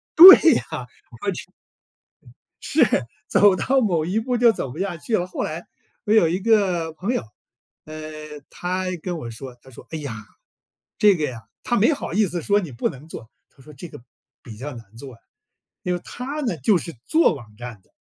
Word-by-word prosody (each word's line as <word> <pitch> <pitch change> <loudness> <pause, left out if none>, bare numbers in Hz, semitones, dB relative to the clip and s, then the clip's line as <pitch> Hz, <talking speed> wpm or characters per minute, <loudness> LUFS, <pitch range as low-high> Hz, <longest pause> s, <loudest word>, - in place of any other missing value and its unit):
对 370 +3 +12
呀， - - 0
我 - - -5 1.7
就 285 -3 +3
是。 130 - 0 0.3
走 205 -2 +5
到 265 +8 +1
某 170 -8 0
一 190 +5 0
步 245 +2 -1
就 235 -1 +5
走 140 - -5
不 - - -10
下 195 -3 -2
去 220 +8 -4
了， 175 - -2
后 180 - -5
来， 160 +3 -5 0.4
我 210 - 0
有 195 -7 +5
一 180 +3 -1
个 185 -7 +1
朋 195 +9 -3
友， - - -1 0.6
嗯， 155 -1 -9
他 185 +1 -3 0.2
跟 175 -2 -4
我 120 -6 -7
说 125 +3 -9
他 - - -19
说： 125 - -14
“哎 160 - -3
呀， 140 -6 -6 0.8
这 205 -1 +6
个 155 -4 -2
呀” 120 -5 -5 0.2
他 240 - 0
没 230 +9 +4
好 280 - -4
意 215 +2 +3
思 175 -1 -4
说 205 +5 +2
你 170 -10 -5
不 115 - -1
能 135 +3 -11
做， 120 -8 -10 0.2
他 135 - -21
说 150 +2 -14
这 170 +6 -9
个 - - -12 0.4
比 110 -3 -11
较 130 +4 -7
难 115 -2 -14
做 130 +2 -10
啊， 115 - -22 0.6
因 180 - -1
为 175 - -4
他 275 +5 -6
呢 235 - -2
就 175 +7 +2
是 170 - -7
做 320 - +3
网 120 -6 -12
站 120 -5 -9
的， - - -33
170 Hz, 215 characters per minute, -22 LUFS, 140-205 Hz, 1.7 s, 对